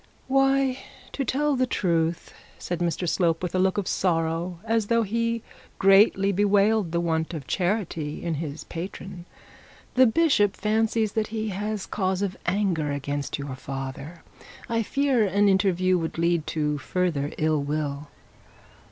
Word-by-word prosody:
'Why, 270 -1 +2 0.3
to 275 - -2
tell 285 +3 +1
the 255 0 +1
truth,' 170 -6 -1 0.2
said 175 -1 -4
Mr 175 +1 -1
Slope, 165 0 +1
with 180 - -2
a 185 - +1
look 190 +1 +2
of 200 -3 -1
sorrow, 165 0 0
as 225 -2 +1
though 230 0 +3
he 230 +2 -1 0.3
greatly 195 0 +5
bewailed 205 -1 +2
the 170 - 0
want 165 0 -1
of 145 -4 -6
charity 175 -5 -2
in 170 -1 -1
his 155 -1 -5
patron, 180 +1 -7 0.7
'the 255 0 +6
bishop 225 -7 +3
fancies 220 0 +1
he 220 0 -3
has 205 +1 -3
cause 190 -1 -1
of 190 -2 -2
anger 175 -6 0
against 145 0 -3
your 140 -2 -5
father. 135 +5 -7 0.4
I 230 0 0
fear 270 0 +1
an 205 +1 +2
interview 185 -2 +3
would 160 -1 -4
lead 170 -1 +1
to 150 -2 -1
further 155 -2 -1
ill 155 -1 +1
will.' 145 0 -3
185 Hz, 145 wpm, -25 LUFS, 160-215 Hz, 0.7 s, the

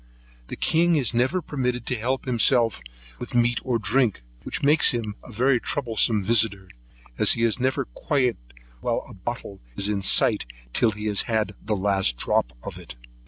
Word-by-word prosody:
The - - -6
king 170 +1 +2
is 130 -6 0
never 130 +10 0
permitted 125 -4 -3
to 125 - -1
help 125 +5 -2
himself 120 -2 +3 0.4
with 125 +1 -7
meat 120 0 +2
or 125 -3 0
drink, 115 - 0 0.2
which - - -5
makes 150 +3 +5
him 110 -4 -3
a - - -12
very 125 +3 +2
troublesome 115 -5 +1
visitor, 105 -3 +1 0.5
as - - +5
he 115 - -2
is 115 +1 +1
never 130 +1 0
quiet 125 - -1 0.4
whilst - - -3
a - - -11
bottle 100 0 -7 0.2
is 100 - +1
in 100 -2 -1
sight 95 - +3 0.3
till 115 - +4
he 105 +1 -7
has 105 -2 +3
had 110 -2 0
the 105 0 -1
last 95 -9 0
drop - - 0
of - - -7
it. - - -11
115 Hz, 175 wpm, -24 LUFS, 105-130 Hz, 0.5 s, makes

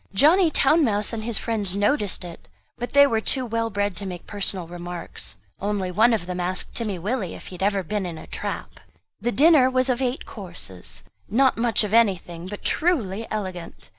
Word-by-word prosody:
Johnny 325 - +5
Town 310 +2 +4
mouse 210 -3 +1
and 220 -1 -3
his 230 -2 -2
friends 210 -5 -2
noticed 205 -3 +1
it; 170 -1 -10 0.3
but 245 - -4
they 285 0 +8
were 225 -5 +1
too 260 +3 0
well 230 0 -1
bred 205 -2 -1
to 205 - -2
make 180 -2 -7
personal 195 -3 0
remarks; 175 - -7 0.2
only 200 -2 -1
one 220 +6 +4
of 220 -6 0
them 180 0 -4
asked 180 +1 -2
Timmy 215 -5 -2
Willie 200 +1 -2
if - - -10
he - - -11
had 180 - -9
ever 200 -1 +1
been 195 +2 -2
in 165 -2 -6
a - - -9
trap? - - -5 0.4
The 240 +4 -1
dinner 290 -1 +6
was 255 0 +1
of 255 0 +1
eight 255 +1 -1
courses; 170 - -8 0.3
not 260 +4 +4
much 230 -2 +2
of 210 0 -3
anything, 185 -6 +2
but 205 +1 -7
truly 230 - 0
elegant. 185 -5 -6
210 Hz, 195 wpm, -24 LUFS, 185-245 Hz, 0.4 s, they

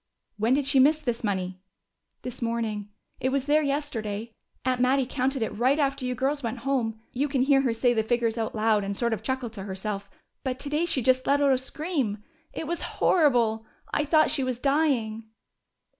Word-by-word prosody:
"When 225 +5 +3
did 285 -1 0
she 275 -1 +4
miss 300 +4 +5
this 240 -7 -3
money?" 185 -3 -2 0.6
"This 250 -1 -7
morning. 225 -3 -2 0.3
It 260 - 0
was 270 0 0
there 300 +2 +4
yesterday. 235 -7 -3 0.3
Aunt 255 -1 +1
Mattie 260 +1 +3
counted 265 0 -1
it 220 - -4
right 255 +6 +3
after 275 -3 0
you 250 - -1
girls 275 +3 0
went 235 -1 -4
home. 235 -5 0
You 275 +4 0
can 270 -3 +1
hear 270 0 +4
her 260 -3 +1
say 240 +2 +2
the 220 - +2
figures 230 0 0
out 225 -1 -3
loud 215 -1 +2
and 200 0 -3
sort 235 -2 +1
of 220 - -3
chuckle 260 -3 -3
to 210 -3 -8
herself. 200 +1 -4 0.3
But 260 -2 -2
today 295 +5 -1
she 280 -7 0
just 255 +1 +2
let 285 +1 +4
out 280 -2 +4
a - - +3
scream. 270 - -2 0.3
It - - -5
was 340 +2 -3 0.2
horrible! 235 -9 +3 0.3
I 295 - +2
thought 310 +1 +4
she 290 -3 +1
was 255 -2 -2
dying." 255 -6 +1
255 Hz, 200 wpm, -26 LUFS, 225-280 Hz, 0.6 s, miss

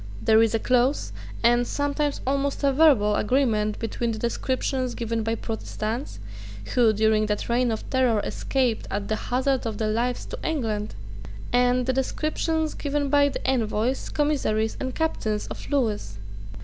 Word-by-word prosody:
There 220 - +4
is 225 0 +2
a - - +4
close, 250 +4 +1 0.3
and 240 +1 +4
sometimes 285 0 -1
almost 275 +2 -1
a 275 -1 +3
verbal, 260 -9 +5
agreement 215 -3 +1
between 230 +1 -2
the 220 - -4
description 255 +2 -1
given 230 -1 -2
by 225 +1 -1
Protestants, 225 +2 -4 0.6
who, 240 -3 +5
during 215 0 +2
that 210 0 -2
reign 245 +1 +2
of 220 - -4
terror, 255 -4 +3
escaped, 250 -2 -1
at 200 0 -3
the 220 - +1
hazard 260 +2 0
of 220 -2 -4
their 215 0 0
lives, 245 +3 -1
to - - -7
England, 220 -9 -2 0.6
and 245 0 +3
the 260 - +1
descriptions 310 +4 -1
given 285 -1 -2
by 285 0 +4
the - - -6
envoys, 245 0 0
commissaries, 270 -8 0
and 260 -1 -4
captains 220 -10 -1
of - - -8
Lewis. 215 - -1
245 Hz, 155 wpm, -25 LUFS, 220-275 Hz, 0.6 s, verbal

